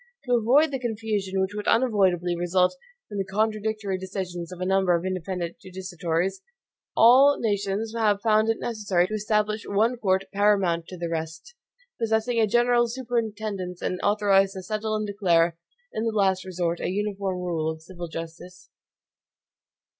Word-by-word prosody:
To 250 - 0
avoid 255 +7 +4
the 270 - -2
confusion 215 -5 -2
which 190 +1 0
would 210 0 -5
unavoidably 190 -7 +2
result 180 +5 +1 0.3
from 205 - -5
the - - +1
contradictory 215 -1 -1
decisions 185 -2 -5
of 180 - -9
a 185 - -2
number 190 -1 +3
of 170 +1 -2
independent 185 -2 -3
judicatories, 185 - -3 0.6
all 265 +5 +7
nations 205 0 -1
have 210 -3 +2
found 215 0 +3
it 225 - +1
necessary 205 -6 0
to 215 - -6
establish 215 0 0
one 225 +5 +1
court 190 -4 +1
paramount 195 -5 +2
to 185 - -9
the 170 0 -3
rest, 160 - -5 0.5
possessing 225 +1 +1
a 220 - +4
general 240 +2 +3
superintendence, 220 -7 -3
and 185 - -2
authorized 200 -2 +3
to 190 -2 -7
settle 215 +2 -2
and 215 0 -1
declare 175 -5 +2 0.4
in 220 - -2
the 230 - 0
last 190 -3 +1
resort 175 -2 -2
a - - -2
uniform 200 -1 -2
rule 170 -3 -2
of 160 0 -6
civil 175 0 -8
justice. 165 +2 -9
195 Hz, 155 wpm, -25 LUFS, 180-220 Hz, 0.6 s, all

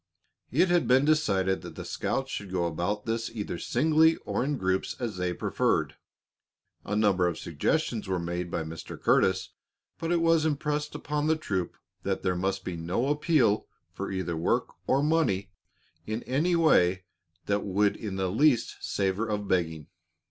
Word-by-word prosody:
It 175 +8 +3
had 175 -1 +3
been 130 +2 +5
decided 100 -12 +2
that - - -9
the - - -7
scouts 135 0 -2
should 100 -2 -5
go 90 -2 0
about 90 +6 -2
this 115 0 -1
either 105 -6 -5
singly 160 +5 +3
or - - -1
in 145 +1 -1
groups, 95 -3 -1
as 115 -6 -3
they 90 -1 -1
preferred. - - 0 0.9
A 105 - -3
number 100 -4 +3
of 85 - -2
suggestions 110 - -1
were 95 -1 0
made 85 0 -3
by 80 - -2
Mr. 80 0 -8
Curtis, 95 0 +2 0.5
but 165 0 -2
it 175 - +3
was 165 -1 +3
impressed 150 -1 -1
upon 150 0 -2
the 160 - +4
troop 95 - -3 0.2
that - - -2
there 90 - +1
must 95 +1 -2
be 90 - -3
no 90 +11 -1
appeal 145 -8 +2 0.3
for - - -4
either 90 -3 -2
work 80 - 0 0.2
or 135 +2 +3
money 125 - +1 0.6
in 110 +2 -3
any 160 +7 +1
way 95 - +4 0.4
that 100 0 0
would 100 +1 +2
in 105 -3 -5
the 95 -1 -1
least 125 +1 +2
savor 100 +3 -1
of 105 -2 -2
begging. 80 -4 0
105 Hz, 170 wpm, -28 LUFS, 95-150 Hz, 0.9 s, been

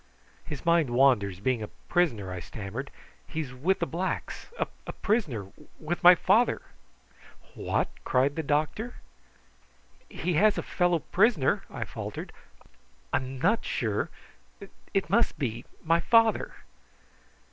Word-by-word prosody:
"His 150 0 -7
mind 170 -4 +4
wanders, 120 -7 +3
being 120 +2 0
a 105 - -4
prisoner," 120 - -1
I 90 - -4
stammered. 105 - -6 0.4
"He 160 - -3
is 130 -5 -7
with 165 +10 +1
the 170 - -1
blacks 175 +3 -4
a - - -5
prisoner 140 - -1 0.3
with 165 +3 -3
my 180 +1 +10
father." 215 +8 +3 0.9
"What?" - - -1 0.2
cried 135 +3 +2
the 160 - -1
doctor. 155 +11 -1 1.1
"He 180 - -2
has 205 +7 +4
a - - -1
fellow 175 -2 +1
prisoner," 185 - +2
I - - -4
faltered. - - -7 0.8
"I - - +5
am 130 0 -5
not 205 - +2
sure - - -1 0.8
it 195 - 0
must 235 -7 +2
be 120 -4 -3 0.2
my 165 +1 +3
father!" 225 +3 +3
155 Hz, 130 wpm, -28 LUFS, 125-180 Hz, 1.1 s, my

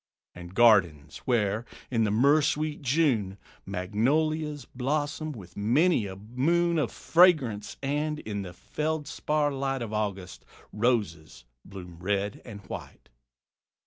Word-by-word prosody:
And 90 +1 -11
gardens, 90 -11 +4
where, 110 -3 +1 0.3
in 115 -3 +2
the - - 0
myrrh 140 +9 +4
sweet 150 +1 -1
June, 125 -9 +1 0.3
Magnolias 145 - 0
blossom 145 +4 -2
with 95 - -11
many 120 - +2
a 95 - -7
moon 160 - +1
Of 140 - -1
fragrance; 150 - +3
and, 150 +2 -1
in 105 -7 -5
the 90 -2 -7
feldspar 150 - -2
light 135 -2 -2
Of 110 -2 -6
August, 100 -4 -3 0.3
roses 105 - -1 0.2
bloom 90 -3 -11
red 100 +2 -2
and 105 -4 -9
white. 95 - -9
120 Hz, 120 wpm, -27 LUFS, 100-150 Hz, 0.3 s, gardens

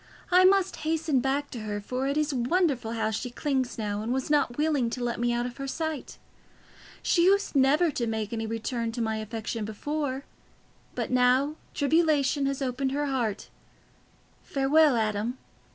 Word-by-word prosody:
"I 365 +1 +6
must 385 0 +3
hasten 315 -3 0
back 275 +3 -1
to 240 - -6
her, 210 -1 -4
for 255 +6 -3
it 280 +2 0
is 300 -1 +1
wonderful 255 -2 +1
how 220 -1 -1
she 250 +4 -3
clings 260 0 -2
now, 205 -2 -2
and 225 +2 -3
was 265 +3 -1
not 285 -5 +2
willing 295 -6 +1
to 245 +1 -4
let 240 -1 -2
me 240 0 +1
out 240 0 0
of 245 -1 -6
her 275 - -5
sight. 315 0 -4 0.9
She 340 -1 +3
used 400 -2 +3
never 290 +5 +4
to 240 -4 -2
make 220 -1 -3
any 225 -1 -2
return 230 +1 -2
to 240 - -5
my 220 -1 -1
affection 220 +1 -4
before, 275 +5 -3 0.7
but - - -3
now 255 +3 +3 0.2
tribulation 285 -2 +2
has 275 0 -2
opened 265 +1 -1
her 290 +1 0
heart. 240 -7 -2 0.9
Farewell, 280 +1 +3
Adam. 220 +2 -1
265 Hz, 170 wpm, -27 LUFS, 230-295 Hz, 0.9 s, I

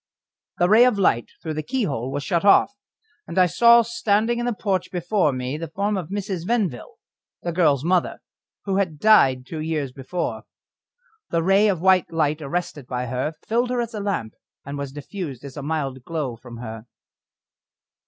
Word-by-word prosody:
The 175 - +3
ray 215 +5 +7
of 250 -5 +2
light 120 -12 +2
through 160 -2 -3
the 155 - -2
keyhole 150 - -2
was 145 - -3
shut 170 +3 0
off, 205 +6 +5 0.5
and - - -7
I 185 - +6
saw 235 +7 +6
standing 230 0 0
in 240 - -1
the - - +1
porch 190 -4 -1
before 180 -2 +1
me 130 +3 -4
the 165 - -4
form 200 +6 -1
of 180 -5 -4
Mrs. 195 -3 -3
Venville, 195 - -2 0.5
the 175 - -2
girl's 155 -6 +2
mother, 180 +1 +1 0.5
who 195 -1 0
had 180 -6 -1
died 135 -10 +4
two 160 +3 -6
years 155 -4 -2
before. 135 +7 -4 0.9
The 165 -1 0
ray 195 +4 +4
of 185 -5 0
white 190 -1 +3
light 155 -1 0
arrested 145 -2 -4
by 125 -1 -3
her 130 +6 -3
filled 240 +2 +1
her 250 -1 -1
as 235 -1 -3
a 215 - -4
lamp 195 - -2 0.3
was 140 -1 -5
diffused 145 - -7
as 135 - -9
a 145 - -5
mild 140 -4 -3
glow 150 -7 -3
from 120 +1 -11
her. 115 -1 -8
170 Hz, 180 wpm, -23 LUFS, 140-200 Hz, 0.9 s, ray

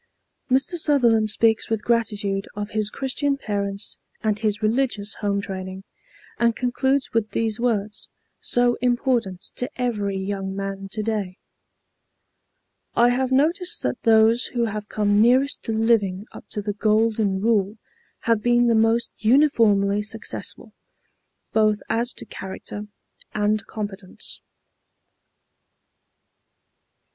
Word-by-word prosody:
Mr. 270 +7 +2
Sutherland 240 -9 +3
speaks 220 +1 +2
with 225 -2 -1
gratitude 210 -4 0
of 205 0 -4
his 215 -1 0
Christian 275 +3 -1
parents 200 -4 -3 0.2
and 215 -1 +1
his 215 0 -1
religious 215 -2 0
home 200 -1 0
training, 190 -2 -6 0.6
and 235 -1 +3
concludes 265 +2 0
with 225 -2 +1
these 225 -1 -1
words, 215 -4 -1 0.3
so 245 0 +2
important 240 -6 +1 0.2
to 250 - -2
every 205 -6 -1
young 195 0 -3
man 195 0 -5
to 215 +2 -3
day: 205 -4 -2 1.6
"I 240 +1 +5
have 255 +1 0
noticed 335 +7 +1
that 125 - -2
those 225 +1 +4
who 235 - +3
have 210 -1 -5
come 205 -1 +2
nearest 260 +5 +3
to - - -2
living 220 -4 +1
up - - -12
to 210 - -4
the 205 0 -2
Golden 215 -1 +1
Rule 210 -1 +1 0.4
have 230 -2 +1
been 240 +1 +3
the 235 - +4
most 225 +1 +2
uniformly 215 -5 +4
successful, 220 +1 -5 0.8
both 215 -1 +3
as 235 +2 +1
to - - -9
character 200 +2 -7 0.5
and 210 0 +1
competence." 205 -3 -7
220 Hz, 120 wpm, -23 LUFS, 205-240 Hz, 1.6 s, I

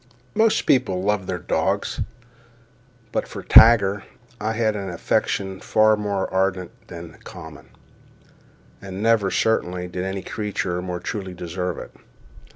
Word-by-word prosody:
Most 220 0 +3
people 95 -8 +2
love 100 -2 0
their 90 - -2
dogs—but 115 +3 -5
for - - -8
Tiger 105 -3 +7 0.4
I 110 +1 -1
had 110 -1 +1
an 100 -2 -4
affection 95 +2 -1
far 110 0 +4
more 100 -2 -2
ardent 95 -1 0 0.2
than 85 -3 -10
common; 80 -3 -11 1.1
and 95 +1 -6
never, 115 -4 +3
certainly, 90 -5 0
did 90 0 -4
any 95 0 -4
creature 100 -4 -3
more 90 -1 -4
truly 95 0 -5
deserve 90 +1 -4
it. - - -8
100 Hz, 125 wpm, -23 LUFS, 90-110 Hz, 1.1 s, Tiger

